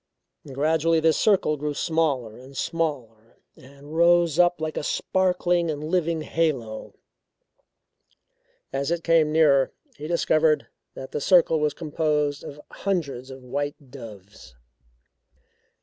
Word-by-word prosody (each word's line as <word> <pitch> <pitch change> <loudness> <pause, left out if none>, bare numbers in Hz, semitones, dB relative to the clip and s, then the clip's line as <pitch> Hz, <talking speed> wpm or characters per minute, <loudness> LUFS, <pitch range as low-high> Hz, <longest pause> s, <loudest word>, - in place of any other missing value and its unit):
Gradually 160 +4 +2
this 160 -1 +3
circle 190 -7 +2
grew 150 0 -3
smaller 145 -10 -1
and 130 +3 -13
smaller 125 -10 -4 0.2
and 140 +3 -13
rose 170 -1 +4
up 175 -1 +4
like 155 0 -3
a - - -2
sparkling 180 +1 0
and 150 -1 -4
living 165 0 0
halo. 135 -10 -2 1.8
As 140 +2 -1
it 170 -1 -1
came 165 -2 +3
nearer, 145 -4 +4 0.3
he 150 - -7
discovered 160 -2 +2 0.3
that 130 - -8
the - - -3
circle 165 -1 +4
was 150 -1 0
composed 150 -2 -1
of 145 - -9
hundreds 145 -10 -3
of 130 -1 -11
white 140 +1 -5
doves. 105 - -12
150 Hz, 120 wpm, -24 LUFS, 135-165 Hz, 1.8 s, rose